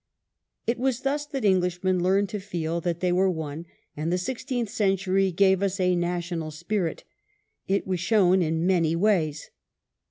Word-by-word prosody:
It 235 +1 -1
was 260 -1 0
thus 290 +2 -1
that 270 -6 -3
Englishmen 185 -1 +2
learnt 195 +2 +2
to 210 - -3
feel 170 -4 -3
that 170 0 -2
they 180 -1 +1
were 190 +2 +3
one, 160 -1 -5 0.3
and 155 +3 -2
the 180 - +2
sixteenth 245 +3 -3
century 195 -1 +1
gave 190 +1 +3
us 200 0 -1
a 180 -1 +2
national 175 -2 -2
spirit. 170 +3 -3 0.6
It 195 +1 0
was 185 -2 -2
shown 185 -1 +3
in 165 0 0
many 170 -3 +2
ways. 165 -6 0
185 Hz, 160 wpm, -26 LUFS, 170-200 Hz, 0.6 s, were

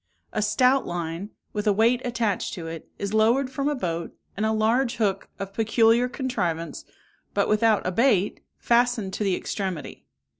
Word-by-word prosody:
A - - 0
stout 250 +6 +3
line, 175 +3 -4 0.2
with 210 0 -2
a - - +6
weight 230 +4 +3
attached 235 -6 -1
to 170 -4 -7
it, 165 -1 -7
is 200 +1 -4
lowered 235 +5 +3
from 275 +2 -1
a 295 - 0
boat, 170 -8 -3 0.2
and 215 +2 0
a - - +1
large 230 +3 +2
hook, 195 -4 -1
of 195 0 -6
peculiar 225 +2 +3
contrivance, 180 - -3 0.5
but - - +2
without 215 0 +3
a 185 - 0
bait, 210 -2 +2 0.2
fastened 235 -5 +2
to - - -2
the 195 -3 +2
extremity. 180 -10 -5
215 Hz, 165 wpm, -25 LUFS, 190-240 Hz, 0.5 s, a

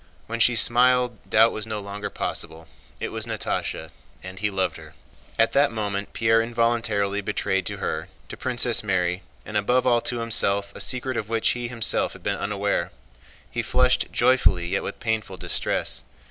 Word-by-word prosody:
When 115 +1 -4
she 120 +1 +4
smiled 125 0 +4
doubt 115 +1 +6
was 110 0 -5
no 110 -1 -3
longer 100 +1 -5
possible, 80 0 -4 0.3
it - - -3
was 110 0 -4
Natásha 110 -2 -3 0.3
and 95 0 -8
he 105 +1 0
loved 95 -2 -1
her. 80 0 -13 0.4
At 115 0 +4
that 140 -1 +3
moment 100 -2 -3
Pierre 115 0 +3
involuntarily 115 -4 0
betrayed 95 -2 -1
to - - -4
her, - - -3 0.2
to - - -6
Princess 120 -2 +1
Mary, 90 -2 0 0.2
and 105 - -8
above 125 +5 +2
all 120 -2 +4
to 120 - 0
himself, 100 -3 +1
a - - -9
secret 130 0 -1
of 105 - -3
which 115 -1 +2
he 120 0 -1
himself 120 -2 +1
had - - -14
been - - -1
unaware. 100 0 -1 0.6
He 120 - -1
flushed 125 +2 +2
joyfully 90 -9 +3
yet 95 +1 0
with 100 - -6
painful 110 -4 -2
distress. - - -2
110 Hz, 175 wpm, -24 LUFS, 100-120 Hz, 0.6 s, doubt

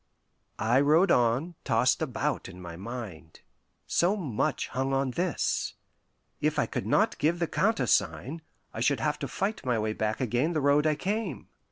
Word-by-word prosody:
I 120 +4 +3
rode 155 +7 +4
on, 125 +8 +2
tossed - - +2
about - - -2
in 90 -1 -11
my 85 -2 -8
mind. 95 -5 -8 0.4
So 180 +4 +2
much 140 - -1
hung 135 +2 -1
on 135 -1 +1
this. 175 +4 -1 0.6
If - - 0
I - - +3
could - - -4
not - - +2
give 160 +4 +2
the 170 - 0
countersign, 135 - +1 0.3
I - - -5
should 130 +2 +2
have 150 +4 -1
to 140 - -3
fight 195 - -2
my 125 -3 +1
way 110 0 -1
back 110 0 -2
again 130 +6 0
the 155 - +1
road 145 +2 +4
I 155 - +2
came. 195 - -3
135 Hz, 170 wpm, -28 LUFS, 115-160 Hz, 0.6 s, rode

